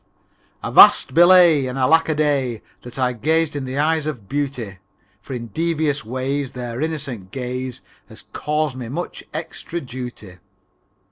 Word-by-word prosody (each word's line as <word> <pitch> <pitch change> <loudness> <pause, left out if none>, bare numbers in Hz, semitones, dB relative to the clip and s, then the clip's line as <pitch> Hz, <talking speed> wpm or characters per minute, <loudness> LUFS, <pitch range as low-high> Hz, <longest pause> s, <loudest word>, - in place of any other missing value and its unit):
III - - -3
Avast! - - +7
Belay, 175 -5 +6
And 125 +1 -5
alack 160 +6 +3
a 155 - +1
day 140 -7 0 0.2
That 125 +1 -9
I 125 -1 +1
gazed 155 +6 0
in 140 -2 -3
the 130 +1 -5
eyes 155 +1 +1
of 125 -10 -6
beauty. 130 -8 -4 0.4
For 130 - -8
in 120 -2 -6
devious 155 +1 -1
ways 130 +3 -3
Their 120 0 -5
innocent 140 -11 -3
gaze 125 +1 -5 0.3
Has - - -9
caused 150 -2 -1
me 125 -3 -7
much 170 +7 -5
extra 165 +2 -5
duty. 120 - -8
135 Hz, 150 wpm, -21 LUFS, 125-155 Hz, 0.4 s, Avast